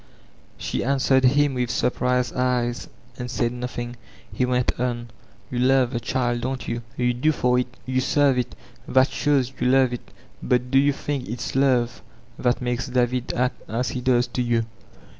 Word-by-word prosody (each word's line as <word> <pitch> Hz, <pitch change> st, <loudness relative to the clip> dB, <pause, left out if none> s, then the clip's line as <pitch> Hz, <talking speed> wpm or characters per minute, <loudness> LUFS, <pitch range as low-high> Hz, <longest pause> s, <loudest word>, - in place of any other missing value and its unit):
She -, -, -2 dB
answered 130 Hz, 0 st, +2 dB
him 140 Hz, +2 st, +4 dB
with 125 Hz, -2 st, -1 dB
surprised 125 Hz, +1 st, 0 dB
eyes 125 Hz, -1 st, 0 dB, 0.3 s
and 125 Hz, 0 st, -4 dB
said 120 Hz, -1 st, 0 dB
nodi 125 Hz, 0 st, -5 dB
ing. 120 Hz, 0 st, -7 dB, 0.4 s
He 125 Hz, -, 0 dB
went 125 Hz, -1 st, 0 dB
on: 120 Hz, -2 st, -2 dB, 0.4 s
"You 125 Hz, -, -2 dB
love 130 Hz, -1 st, +3 dB
the 120 Hz, -, 0 dB
child, 120 Hz, 0 st, -1 dB
don't 130 Hz, +1 st, -3 dB
yon? 115 Hz, 0 st, -2 dB, 0.2 s
Yoo 125 Hz, 0 st, +2 dB
do 130 Hz, +6 st, +2 dB
for 125 Hz, -4 st, +2 dB
it, 125 Hz, 0 st, -4 dB
you 130 Hz, 0 st, 0 dB
serve 140 Hz, -1 st, +3 dB
it. 125 Hz, -, -3 dB, 0.3 s
That 130 Hz, +1 st, +4 dB
shows 140 Hz, -3 st, +1 dB
jrou 125 Hz, -1 st, -1 dB
love 130 Hz, -2 st, +4 dB
it 120 Hz, -, -8 dB, 0.3 s
Bvt 125 Hz, 0 st, +1 dB
do 135 Hz, -, +6 dB
you 140 Hz, +1 st, +4 dB
think 140 Hz, -2 st, -4 dB
it's 120 Hz, +2 st, -4 dB
love 125 Hz, -3 st, +2 dB, 0.4 s
that 125 Hz, 0 st, +1 dB
makes 125 Hz, +1 st, -1 dB
David 125 Hz, 0 st, 0 dB
act 125 Hz, +1 st, 0 dB
as 115 Hz, +2 st, -1 dB
he 125 Hz, -, -4 dB
does 125 Hz, -1 st, +3 dB
to 125 Hz, -, -2 dB
you? 120 Hz, -2 st, +1 dB
125 Hz, 180 wpm, -24 LUFS, 120-130 Hz, 0.4 s, do